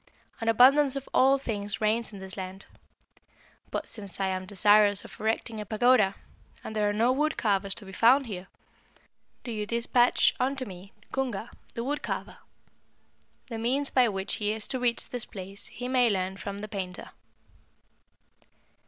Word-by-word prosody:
An 225 - -4
abundance 270 +4 +6
of 275 -1 -5
all 270 +1 +5
things 205 -6 -4
reigns 220 +1 +1
in 205 - -9
this 190 -1 -7
land; 190 0 -7 1.0
but - - -4
since 200 -4 -3
I 195 -1 +1
am 185 0 -3
desirous 205 +1 +4
of - - -12
erecting 220 0 -2
a - - -6
pagoda, 215 -2 +3 0.5
and 220 - -7
there 210 -1 +2
are - - +1
no 225 +4 +2
wood 300 +4 0
carvers 200 -2 +1
to 210 - -6
be 190 - -10
found 245 +8 +5
here, 190 -5 -7 1.0
do 240 - -5
you 210 -2 -3
despatch 235 +1 +3
unto 265 +1 0
me 190 -1 -11 0.2
Cunga, 240 -4 -3 0.2
the 230 - -3
wood 290 +4 -2
carver. - - -5 1.1
The 225 -2 -6
means 265 +5 +1
by 250 -3 +4
which 195 0 -3
he 210 -1 0
is 220 -1 -3
to 260 - -2
reach 245 -1 +1
this 245 -2 -4
place 195 +1 -8
he 245 +2 -6
may 250 -2 +3
learn 190 -2 -1
from 200 0 -6
the 210 +1 -6
painter.' 190 -4 -6
215 Hz, 170 wpm, -28 LUFS, 200-245 Hz, 1.1 s, abundance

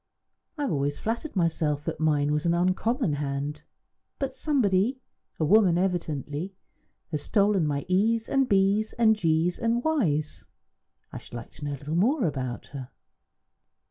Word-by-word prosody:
"I 295 - -2
have 275 - -1
always 145 0 -1
flattered 235 +7 -3
myself 160 -4 0
that - - -3
mine 150 -2 +2
was 150 +3 0
an 170 - +3
uncommon 185 - +1
hand. 145 +1 -3 0.6
But 270 -1 -3
somebody 255 -4 +1 0.4
a 155 - +2
woman 190 -1 +5
evidently 175 -1 -2 0.6
has 150 -2 -2
stolen 200 -1 +2
my 140 -1 -2
e's 220 +5 +2
and 270 -1 +1
b's 200 +2 +2
and 225 -2 +4
g's 165 -2 +1
and 235 +1 0
y's. 160 - 0 0.7
I - - -5
should - - -12
like 120 - -8
to 145 - -9
know 145 - -2
a - - -5
little 145 +3 -6
more 235 - +2
about 130 -5 -3
her." 135 -3 -8
175 Hz, 155 wpm, -27 LUFS, 150-220 Hz, 0.7 s, woman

